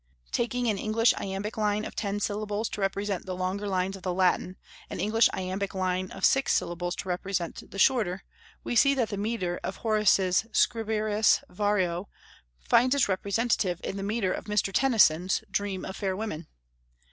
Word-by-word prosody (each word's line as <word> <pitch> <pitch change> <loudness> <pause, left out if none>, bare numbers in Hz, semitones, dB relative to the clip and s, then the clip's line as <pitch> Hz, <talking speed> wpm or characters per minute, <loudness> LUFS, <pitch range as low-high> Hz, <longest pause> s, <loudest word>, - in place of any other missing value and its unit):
Taking 245 +1 -1
an 210 -3 0
English 225 +2 +3
iambic 195 +3 -4
line 210 0 0
of - - -7
ten 205 -1 -2
syllables 210 +1 -2
to 210 - -5
represent 195 0 -2
the 185 - -3
longer 185 +3 -2
lines 190 0 -1
of 195 - -11
the 180 -1 -2
Latin, 185 0 +1 0.3
an - - -6
English 225 +2 +3
iambic 190 +2 -3
line 185 0 -1
of - - -1
six 270 0 +3
syllables 175 +1 -2
to - - -6
represent 180 -1 -3
the - - -9
shorter, 195 -5 +2 0.4
we - - -3
see 275 +4 +5
that 240 -5 0
the 205 - -3
metre 200 -4 -2
of - - -3
Horace's 210 -3 +2
"Scriberis 215 -1 +2
Vario" 190 -2 0 0.6
finds 255 +3 +4
its 280 - +3
representative 200 -1 0
in - - -4
the 200 - -4
metre 200 -1 -1
of - - -6
Mr. 210 -2 0
Tennyson's 190 -9 +3
"Dream 200 -2 -2
of 190 - -6
Fair 190 -2 -1
Women." 185 -7 -5
200 Hz, 170 wpm, -27 LUFS, 185-215 Hz, 0.6 s, see